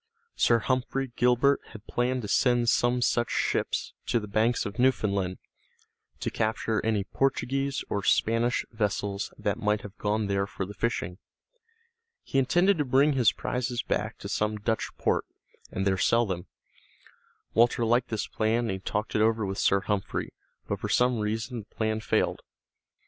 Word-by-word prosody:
Sir 115 - +4
Humphrey 130 +2 -1
Gilbert 125 +3 +3
had 110 -1 -11
planned 125 0 -1
to - - -4
send 120 +1 +3
some 120 +1 +2
such 120 0 +1
ships - - -1
to 120 - +2
the 105 - -7
banks 110 +4 +1
of 100 +3 -6
Newfoundland 100 -7 +1 0.8
to - - -2
capture 110 0 -1
any 110 -3 +1
Portuguese 135 +3 -1
or 100 - -1
Spanish 115 +4 +2
vessels 105 -2 -2
that 100 - -1
might 105 0 +1
have 105 0 -10
gone 105 +1 0
there 100 0 0
for 95 - -4
the 100 - -8
fishing. 100 -4 -2 1.0
He 135 - 0
intended 175 +8 +3
to - - +3
bring 140 +3 +3
his 120 -6 +4
prizes 125 +2 -2
back 110 +2 -2
to - - -7
some 105 +1 -1
Dutch 110 +2 -1
port, - - +1 0.4
and 95 - -2
there 95 -1 +1
sell 115 +5 +3
them. 90 -4 -4 1.1
Walter 120 +1 +3
liked 120 +2 +2
this 110 -2 -2
plan 110 +2 0
and 115 -4 -1
he 95 - -3
talked 105 +3 -3
it 105 - +2
over 110 -1 +2
with 95 0 -3
Sir 100 0 +3
Humphrey, 100 0 -2 0.3
but - - -2
for - - -4
some 125 -1 +3
reason 110 +3 -2
the - - -33
plan 110 0 0
failed. 110 - 0
110 Hz, 165 wpm, -28 LUFS, 105-125 Hz, 1.1 s, Sir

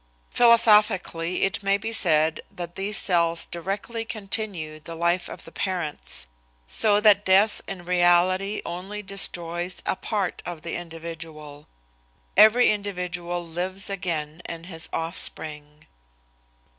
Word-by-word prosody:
Philosophically 210 -7 +4
it 195 +2 0
may 195 0 +2
be 220 +3 -5
said 160 -6 +3
that 175 -1 -7
these 200 +2 -1
cells 170 -2 +1
directly 200 +6 -4
continue 195 -8 -4
the 165 +2 -9
life 170 +2 0
of - - -9
the 165 - -12
parents, 155 - 0 0.4
so 205 - +3
that 210 -1 +5
death 200 +3 +3
in 180 -3 -7
reality 180 +3 +2
only 190 +5 -6
destroys 175 -2 -1
a - - 0
part 200 -3 -3
of 170 -3 -7
the 170 - -4
individual. 160 -3 -9 0.7
Every 220 +3 +6
individual 175 -4 -4
lives 185 +4 -1
again 165 -4 -4
in 165 0 -7
his 165 -2 -6
offspring. 155 -2 -4
175 Hz, 120 wpm, -24 LUFS, 165-200 Hz, 0.7 s, Every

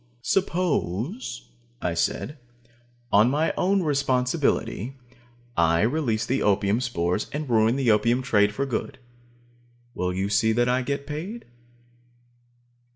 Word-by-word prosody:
"Suppose," 165 - -1 0.3
I - - -1
said, 150 +1 -2 0.7
"on 105 +4 +5
my 150 +4 +1
own 190 +1 +2
responsibility, 130 - 0 0.6
I 85 +1 +3
release 115 -3 0
the 130 +3 0 0.4
spores 90 -7 -1
and 150 0 -4
ruin 115 0 +3
the 135 -4 +2
opium 115 +4 +2
trade 105 -5 +3
for 135 +7 -2
good. 130 - -3 1.0
Will 90 -4 -1
you 95 +2 -1
see 110 +2 +2
that 120 +2 +2
I 125 +1 +2
get 140 +2 -3
paid?" 170 +11 -6
125 Hz, 115 wpm, -25 LUFS, 105-145 Hz, 1.0 s, on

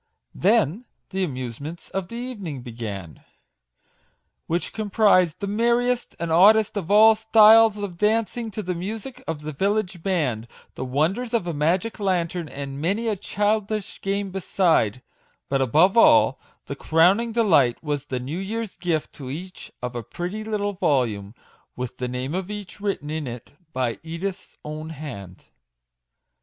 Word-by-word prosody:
Then 210 - +2 0.3
the 190 0 -1
amusements 140 +2 -6
of 195 -2 -3
the 230 - -9
evening 205 - -6
began, 105 -8 -7 1.2
which 170 +2 -2
comprised 205 -5 +3
the 200 - -3
merriest 235 +4 +1
and 170 -1 -2
oddest 210 +6 +5
of 190 -4 -3
all 215 +2 +7
styles 220 0 +6
of 195 -4 -6
dancing 225 +2 +1
to 215 0 -5
the 180 - -2
music 215 +8 -6
of 160 -2 -3
the 155 0 -5
village 195 +1 -1
band, 140 - -1 0.3
the - - -5
wonders 170 - 0
of 220 -6 0
a 170 - -2
magic 175 +10 0
lantern, 175 -4 -1
and 140 0 -6
many 200 +8 0
a 215 - 0
childish 210 +1 -2
game 195 0 -2
beside; 165 - +1 0.5
but 135 -1 +1
above 155 - +4
all, 230 - +6 0.3
the - - -5
crowning 185 +9 +3
delight 165 - +3
was 145 -2 -2
the 130 -3 -3
new 140 +8 -4
year's 220 +2 -4
gift 170 -3 -2
to 135 -3 -8
each 180 +7 -8
of 125 0 -4
a 120 - -2
pretty 175 - -5
little 205 -2 -2
volume, 120 - 0 0.4
with 125 0 -5
the 125 - -3
name 125 +3 -4
of 185 +1 -3
each 205 -3 -7
written 195 -8 -2
in 155 -3 -3
it 120 -1 -8 0.2
by 125 -4 -2
Edith's 170 +4 -6
own 155 +1 -6
hand. 125 - -9
180 Hz, 150 wpm, -24 LUFS, 145-210 Hz, 1.2 s, all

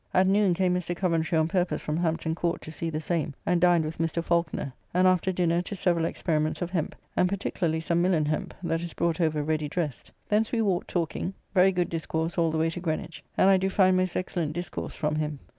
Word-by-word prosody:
At 185 +1 +5
noon 195 -1 +3
came 185 0 +2
Mr. 180 -1 -1
Coventry 165 -2 +1
on 160 0 +3
purpose 180 +1 0
from 150 - -3
Hampton 160 -1 0
Court 170 +1 -1
to 155 - -7
see 165 +1 -3
the 155 -1 -2
same, 160 -3 -2
and 175 -1 +2
dined 175 -3 +4
with 155 +1 -6
Mr. 165 0 0
Falconer, 170 -6 0 0.2
and 185 +1 +4
after 185 0 +3
dinner 175 -1 +1
to 200 - -6
several 175 -4 +1
experiments 155 -2 -1
of 175 - -5
Hemp, 170 -5 -2 0.2
and 180 - +3
particularly 175 -4 -1
some 170 +1 +1
Milan 175 -4 +2
hemp 155 +1 -2
that 165 -1 0
is 170 -1 -6
brought 170 0 0
over 155 -2 +1
ready 155 -1 -1
dressed. 155 -5 -3 0.2
Thence 215 +1 +1
we 230 -2 +1
walked 185 -4 0
talking, 175 +2 -2 0.2
very 190 0 +5
good 180 -2 0
discourse 165 +1 -2
all 165 -1 +3
the 160 - -1
way 165 +1 +1
to 170 - -5
Greenwich, 165 -1 -4
and - - +5
I 195 -1 +6
do 190 +1 0
find 185 -1 +4
most 185 0 0
excellent 170 -4 -2
discourse 175 -1 -5
from 150 0 -1
him. 150 -1 -2
170 Hz, 225 wpm, -27 LUFS, 160-180 Hz, 0.2 s, I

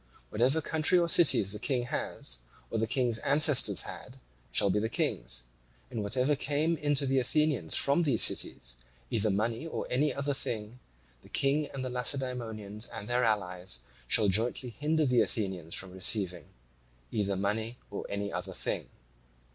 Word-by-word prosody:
Whatever 130 +8 +2
country 160 +4 +2
or 170 -1 +3
cities 145 - +5
the 105 - -5
King 125 +1 -1
has, 60 - -4 0.3
or 115 - -1
the 115 - 0
King's 120 -2 +1
ancestors 150 -2 +5
had, - - -9 0.3
shall 100 +10 +2
be 105 - +1
the 110 +1 -1
king's: - - -2 0.5
and 110 - -3
whatever 125 +8 +2
came 150 +4 0
in 145 0 0
to 140 0 +1
the 135 0 +2
Athenians 130 - +1
from 140 +5 +3
these 140 -9 +3
cities, - - 0 0.3
either 110 -1 +1
money 115 +8 -1
or - - -4
any 145 +4 +2
other 140 0 -2
thing, 115 -2 -4 0.4
the - - -18
King 145 +2 +1
and 130 -1 -5
the - - -3
Lacedaemonians 120 -5 -1
and 110 -3 -7
their 125 +1 +1
allies 90 - -1 0.3
shall 105 - +4
jointly 120 +5 0
hinder 155 +5 0
the 125 -3 +3
Athenians 95 -6 -2
from 95 -1 -3
receiving 95 -1 +1 0.7
either 100 -2 -1
money 110 +5 -2
or 100 - -5
any 100 0 -3
other 90 +2 -5
thing. - - -3
115 Hz, 165 wpm, -30 LUFS, 100-140 Hz, 0.7 s, cities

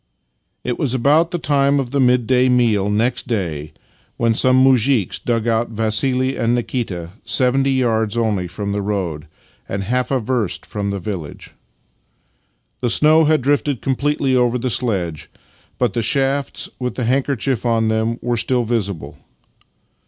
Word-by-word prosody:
It 120 - -3
was 130 -3 +1
about 150 +6 +3
the 175 - -2
time 140 -2 +2
of 125 -3 -3
the 140 - 0
midday 125 0 +3
meal 115 -5 +2
next 115 +4 0
day 80 -10 -3 0.5
when 115 -1 +2
some 130 +3 +3
muzhiks 130 -5 +2
dug 115 -1 -1
out 115 +1 +1
Vassili 125 +4 0
and 120 0 +1
Nikita 105 -9 -3
— - - -39
seventy 135 +1 +2
yards 115 -4 0
only 105 -6 0
from 100 +3 -5
the 100 0 -1
road, 90 -7 -3 0.4
and 100 0 -3
half 125 +5 -1
a 135 - +1
verst 115 -4 -2
from 100 -1 -4
the 100 - -2
village. 90 -6 -6 1.3
The 125 - -1
snow 155 +6 +5
had 155 -3 +2
drifted 145 -1 0
completely 135 0 0
over 125 -1 +2
the 125 +1 -2
sledge, 95 -11 -2 0.5
but 125 -5 0
the 115 - -1
shafts, 135 +3 0
with 125 -2 -3
the 125 - -2
handkerchief 135 0 0
on 115 -2 +1
them, 110 +1 0
were 120 -1 0
still 120 +2 +1
visible. 100 -10 -3
120 Hz, 155 wpm, -19 LUFS, 105-130 Hz, 1.3 s, snow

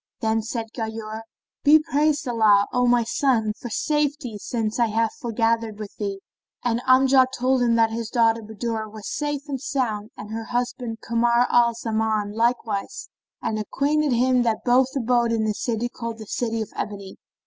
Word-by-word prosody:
[FN#22] - - -52
Then 220 0 +1
said 225 +1 -4
Ghayur, 220 -1 -5 0.6
"Praised 300 -1 +1
be 245 - -2
Allah, 210 -3 +4
O 250 0 +2
my 240 -1 +4
son, 225 -3 +1
for 240 - -5
safety, 285 -4 -1
since 220 +1 -2
I 235 - +4
have 225 +1 0
foregathered 225 -2 0
with 210 -2 -8
thee," 200 -2 -4 0.4
and 235 -1 0
Amjad 260 0 +5
told 255 +1 +2
him 235 -1 +3
that 225 -1 +3
his 225 -1 -4
daughter 230 -1 +2
Budur 220 0 -4
was 215 -1 -8
safe 290 -1 -2
and 270 -3 -4
sound, 225 -7 -2
and 210 +1 -8
her 225 0 -4
husband 245 -1 -3
Kamar 235 +1 +2
al 235 -1 +4
Zaman 220 -2 -1
likewise, 230 - -1 0.3
and 215 - -1
acquainted 285 +6 0
him 250 +1 +3
that 225 -2 -1
both 250 +1 +4
abode 240 -2 +2
in 225 -1 +1
a 215 - 0
city 235 +2 -2
called 230 -2 -6
the 220 - -9
City 225 +1 -2
of 215 - -13
Ebony. 200 -2 -6
230 Hz, 175 wpm, -23 LUFS, 220-250 Hz, 0.6 s, Amjad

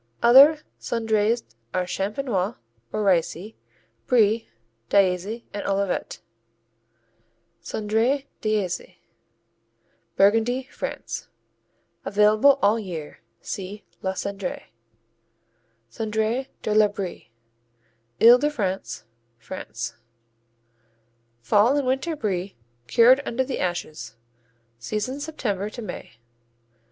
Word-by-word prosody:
Other 275 +6 +8 0.2
Cendrées 225 0 0 0.3
are 185 0 +1
Champenois 200 +2 -2 0.4
or 215 - -1
Ricey, 185 +2 +1 0.5
Brie, 225 -2 +3 0.4
d'Aizy 200 +4 +1
and 205 - -4
Olivet 195 -1 -1 1.4
Cendré 225 +6 0 0.2
d'Aizy 210 -5 -2 1.2
Burgundy, 225 +6 +3
France - - -5 0.8
Available 215 +7 +4
all 210 +3 +4
year. 170 -8 -7 0.2
See 200 +2 -6 0.2
la 190 - -1
Cendrée. 195 - -5 1.2
Cendré 220 - -1 0.2
de 215 - 0
la 215 0 +6
Brie 200 - -6 0.9
Ile 240 +2 +8
de 295 +3 +2
France, 195 -9 -3 0.3
France 115 -4 -7 1.5
Fall 220 - +4
and 285 - 0
winter 265 +6 0
Brie 195 - -3 0.3
cured 245 - +6
under 260 0 -1
the 260 0 -4
ashes, 155 -9 -4 0.6
season 215 - -3
September 215 -10 -3
to 235 +2 -8
May. 180 - -8
210 Hz, 90 wpm, -24 LUFS, 190-240 Hz, 1.5 s, Other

